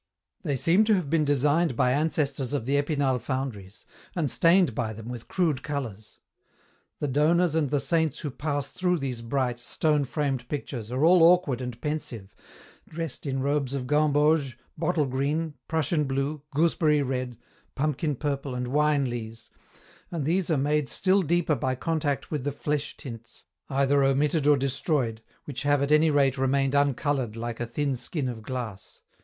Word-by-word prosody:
They 145 -6 -1
seem 170 - +4
to 215 -1 +4
have 170 -7 -2
been 160 -2 +3
designed 145 +1 +2
by 125 +1 +2
ancestors 145 -2 0
of 140 -6 -1
the 140 +3 +1
Epinal 145 -3 +1
foundries, 115 -7 -5 0.3
and 155 -6 +1
stained 170 -5 +4
by 110 -1 -2
them 110 +2 -9
with 120 -2 -7
crude 160 -8 0
colours. 120 -9 -6 0.8
The 145 - -2
donors 155 +5 +3
and 160 -4 +1
the 145 +1 +1
saints 155 +2 +1
who 150 - -4
pass 145 0 -3
through 180 -1 0
these 130 -5 -4
bright, 120 0 -1
stone 150 +3 +1
framed 135 -3 -2
pictures 125 -6 -5
are 130 +5 +1
all 175 +1 +6
awkward 165 -7 +4
and 125 -2 -6
pensive, 120 -10 -4 0.6
dressed 160 -3 -5
in 135 -1 -1
robes 140 -1 0
of 130 -2 -3
gamboge, 150 -1 +2 0.2
bottle 160 -1 +1
green, 145 +5 -1
prussian 155 -1 0
blue, 140 +2 -2
gooseberry 150 -1 +2
red, 125 -2 -3 0.4
pumpkin 150 +1 -1
purple 140 -1 -3
and 125 0 -3
wine 150 0 +2
lees, 115 -2 -7 0.6
and 165 -5 -3
these 175 +3 +1
are 160 - +2
made 145 +1 +1
still 195 +1 +2
deeper 170 -1 +1
by 130 -2 -1
contact 150 0 -2
with 150 -4 -2
the 145 - -1
flesh 145 +1 -3
tints, 115 -4 -10 0.2
either 140 +1 +2
omitted 145 +2 +2
or 145 -1 +6
de 135 +1 0
stroyed, 130 -5 -1 0.2
which 145 - -5
have 145 -1 +2
at 140 - -1
any 155 +1 +5
rate 140 -2 +2
remained 135 +1 +1
uncoloured 140 -4 +1
like 115 0 -5
a 120 - -2
thin 140 +3 -1
skin 130 +3 -3
of 120 -3 -5
glass. 110 -4 -7
140 Hz, 170 wpm, -26 LUFS, 130-155 Hz, 0.8 s, all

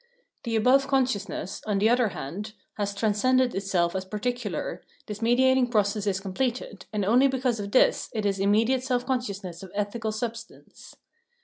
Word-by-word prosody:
The 230 -1 -1
above 260 +5 +4
consciousness, 255 -8 -1
on 205 -2 +1
the 205 +2 +3
other 240 0 +3
hand, 200 +5 -6 0.2
has 205 -1 -3
transcended 245 +5 +2
itself 190 -3 0
as 190 - -1
particular, 210 -1 -3 0.2
this 210 0 -7
mediating 255 +2 +4
process 210 -2 +1
is 195 -1 +1
completed, 210 +1 -3
and 210 -2 -1
only 245 +7 +5
because 255 -3 0
of 200 0 -5
this, 255 - +3
is 200 -3 0
it - - -2
immediate 225 +6 +2
self 250 -2 -1
consciousness 200 -9 -3
of 190 - -9
ethical 215 +2 -2
substance. 230 +1 -7
220 Hz, 155 wpm, -26 LUFS, 200-250 Hz, 0.2 s, only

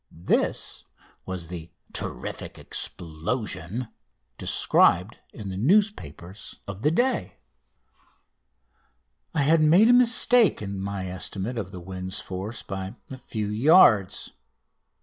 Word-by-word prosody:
This - - 0 0.4
was 95 -2 -5
the 85 -1 -8 0.2
"terrific - - -5
explosion" 95 +5 -4 0.5
described 90 +6 +2
in 105 -3 -8
the 95 - -5
newspapers 110 - -1
of 100 0 -7
the 150 - +3
day. 245 +11 -1 2.0
I 145 - +3
had 160 +3 +4
made 175 +9 +5
a - - +7
mistake 245 -1 +5
in 100 -2 -5
my 100 -1 -4
estimate 95 +5 -2
of 95 -5 -5
the 95 -2 -9
wind's 95 +1 -2
force 95 +5 -6
by 95 +2 -6 0.2
a 130 - -6
few 110 -4 -4
yards. 110 - +4
100 Hz, 110 wpm, -25 LUFS, 95-145 Hz, 2.0 s, a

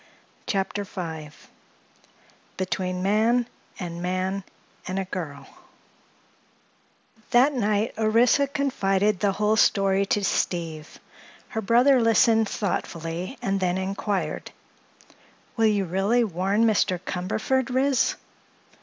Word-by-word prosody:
CHAPTER 200 +1 -1
V 160 -5 -6 1.3
BETWEEN 185 -1 -2
MAN 225 +4 +2 0.3
AND 170 -2 -5
MAN—AND 185 +1 -5
A 195 - -1
GIRL 160 -6 -6 1.8
That 260 +3 +4
night 215 -3 0
Orissa 230 +6 +3
confided 210 -8 0
the 200 -2 +1
whole 210 +2 +1
story 195 -2 +3
to 205 - 0
Steve. 165 -5 -2 0.5
Her 220 - -3
brother 245 +5 +4
listened 225 -1 +4
thoughtfully 175 - -3
and 195 -3 0
then 180 -1 0
inquired: 190 -3 -3 1.1
"Will 225 -2 +3
you 205 -2 +1
really 195 +7 +1
warn 195 +2 +1
Mr. 205 -4 +2
Cumberford, 215 +9 -2
Ris?" 260 0 +2
200 Hz, 100 wpm, -25 LUFS, 185-225 Hz, 1.8 s, That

